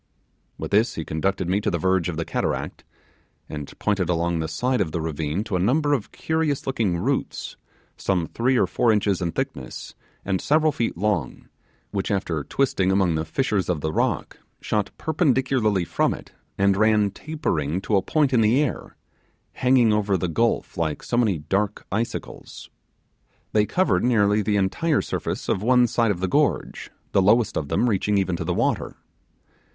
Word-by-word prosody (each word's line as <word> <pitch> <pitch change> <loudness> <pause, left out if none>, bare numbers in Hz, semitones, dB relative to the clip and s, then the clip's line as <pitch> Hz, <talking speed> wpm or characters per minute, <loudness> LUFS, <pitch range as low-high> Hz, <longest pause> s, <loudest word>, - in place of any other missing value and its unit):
With - - -6
this 110 +4 +3
he 80 - -4
conducted 95 +3 -1
me 95 +3 +1
to - - 0
the 85 - 0
verge 95 0 +1
of 80 - -4
the 85 - -2
cataract, - - -3 0.6
and 75 -2 -7
pointed 100 -4 0
along 85 0 0
the 80 - -2
side 125 +9 0
of 80 - -1
the 85 - -1
ravine 80 +3 -2
to 110 -4 -3
a - - +1
number 145 - +2
of 125 -8 -2
curious 160 -3 -1
looking 110 -10 0
roots, - - -2 0.4
some 90 -4 0
three 125 +8 0
or - - +4
four 120 - +2
inches 100 -3 +1
in 85 -2 -1
thickness, - - -5 0.3
and 95 -1 0
several 155 +1 +3
feet 115 - -2
long, 90 -8 -2 0.4
which, 100 -2 -2
after 90 -7 -1
twisting 95 - +1
among 95 -3 +2
the 80 0 -1
fissures 100 +2 -1
of 85 -5 0
the 80 0 -2
rock, - - -1 0.2
shot 105 -2 -1
perpendicularly 130 - +1
from - - 0
it - - -13 0.3
and 100 0 +3
ran 105 -1 +3
tapering 95 - -2
to 100 +2 0
a 95 - +4
point 145 +4 +1
in 120 - +4
the 110 +5 +4
air, 145 -4 -2 0.6
hanging 125 -3 +3
over 105 -2 +1
the 90 - -2
gulf 80 - 0
like 80 -3 -2
so - - -2
many 110 -7 +2
dark 100 +7 -2
icicles. 115 +4 -5 0.8
They 105 -1 +3
covered 185 +1 +1
nearly 105 -4 +3
the 105 0 0
entire 145 - +1
surface - - -4
of 95 - 0
one 125 +2 +4
side 115 -1 +1
of 95 -3 -1
the 95 - +1
gorge, 90 - 0 0.2
the 100 - +3
lowest 105 +3 +3
of 75 - -2
them 120 - +1
reaching 105 -1 +1
even 95 -2 0
to - - -3
the - - -1
water. - - -1
100 Hz, 180 wpm, -24 LUFS, 90-120 Hz, 0.8 s, or